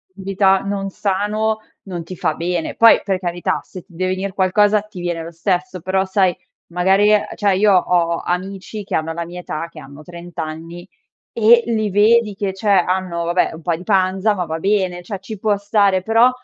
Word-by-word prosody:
vita 195 0 +2
non 195 0 -3
sano, 210 +3 -1 0.2
non 180 -4 -6
ti 185 +2 -9
fa - - 0
bene. 170 -1 -3
Poi, 230 0 +7
per 190 -2 0
carità, 175 -1 -2
se 185 - -11
ti 185 - -23
deve 185 +2 -1
venir 190 +1 -3
qualcosa 205 +2 +3
ti 210 -3 -12
viene 175 -2 -3
lo 165 - -8
stesso, 185 +2 -2
però, 190 +2 0
sai, 190 -1 +1 0.4
magari 190 +4 +3 0.3
cioè, 200 -2 +1
io 205 +1 +4
ho 175 -2 +2
amici 190 +3 -4
che - - -4
hanno 160 +1 -1
la 170 +1 -4
mia 175 +1 -8
età, 165 -1 -5
che 165 - -12
hanno 140 +1 -12
30 175 +1 -11
anni, 165 +2 -6 0.5
e 235 +1 +5
li 220 -2 0
vedi 210 +2 +3
che 195 -1 -2
cioè, 195 +3 -6
hanno, 185 -2 +1
vabbè, 175 +2 +1
un 160 - -10
po' 170 - -2
in 165 +2 -3
panza 190 +1 +2
ma 180 - -2
va 160 -1 -4
bene, 185 -2 0
cioè, 195 +2 -6
ci 195 +2 -8
può 210 0 +1
stare, 200 -2 +2
però, 225 +5 +4
190 Hz, 195 wpm, -19 LUFS, 175-205 Hz, 0.5 s, Poi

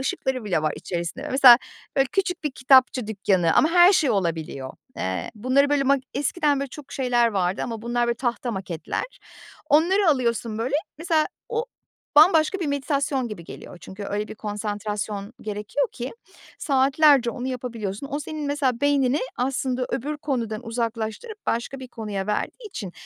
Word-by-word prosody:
ışıkları 265 -2 -2
bile 180 -7 0
var 155 - +1
içerisinde. 180 - -4
Mesela, 255 -2 +9 0.4
böyle, 270 0 +4
küçük 370 -4 -1
bir 300 - 0
kitapçı 260 -3 +4
dükkanı 190 -5 +1
ama 310 - +5
her 355 +2 +7
şey 310 -7 +3
olabiliyor. 160 -8 -2 0.2
Eee, 95 0 -3
bunları, 255 +6 +2
böyle, 290 -1 +3
ma 275 +1 +4 0.2
eskiden 290 +1 +1
böyle 275 - -3
çok 280 +1 -11
şeyler 245 -3 +2
vardı. 190 -3 -1
Ama 225 -3 -5
bunlar, 240 0 0
böyle, 235 - +1
tahta 240 -1 -2
maketler. 190 -6 -4 0.7
Onları 345 +5 +4
alıyorsun, 235 -4 0
böyle, 255 +5 -1 0.2
mesela, 325 -2 +2 0.2
o 465 0 -1 0.5
bambaşka 320 +3 +6
bir 325 - -1
meditasyon 280 -2 -1
gibi 195 -6 -8
geliyor. 175 - -10
Çünkü 200 +2 -8
öyle 210 +1 -3
bir - - -7
konsantrasyon 210 0 -4
gerekiyor 215 +6 -2
ki 245 +1 -5 0.5
saatlerce 275 -2 +4
onu 250 +1 -5
yapabiliyorsun. 240 -2 -4
O 290 - -2
senin, 300 0 -5
mesela, 275 -4 0
beynini 285 -1 +2 0.2
aslında 255 0 -1
öbür 295 +4 -2
konudan 235 -5 -3
uzaklaştırıp 230 - -4
başka 235 +4 -2
bir 255 - -8
konuya 210 -5 -5
verdiği 320 - -3
için 195 - -7
250 Hz, 155 wpm, -24 LUFS, 210-285 Hz, 0.7 s, Mesela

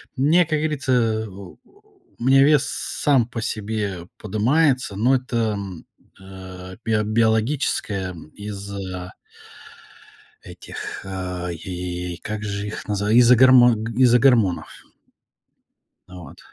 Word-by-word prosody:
мне, 155 +7 +3
как 155 -1 -1
говорится, 150 -4 -2
э, 110 -2 +1
у 95 -2 -12 0.6
меня 135 +2 +5
вес 145 -1 +4
сам 135 -6 0
по 120 -2 -6
себе 105 -5 -4
подымается, 125 +3 +1
но 120 +6 +3
это, 125 -1 -4 0.2
м, 95 -4 -7 0.4
э, 95 -1 -10
био 110 -1 +1
биологическая 110 -3 0 0.2
из-за 100 -3 -7 1.3
этих, - - -8
а, 90 -2 -5
и 90 0 -5
как 105 +4 -6
же 100 0 -4
их 105 - -7
назва 105 0 -1
из-за 120 +2 +6
гормон 125 -3 +6
г 115 +1 -5
из-за 125 -1 +5
гормонов. 115 -8 +3 1.4
Вот. 90 -2 -12
105 Hz, 115 wpm, -22 LUFS, 95-125 Hz, 1.4 s, из-за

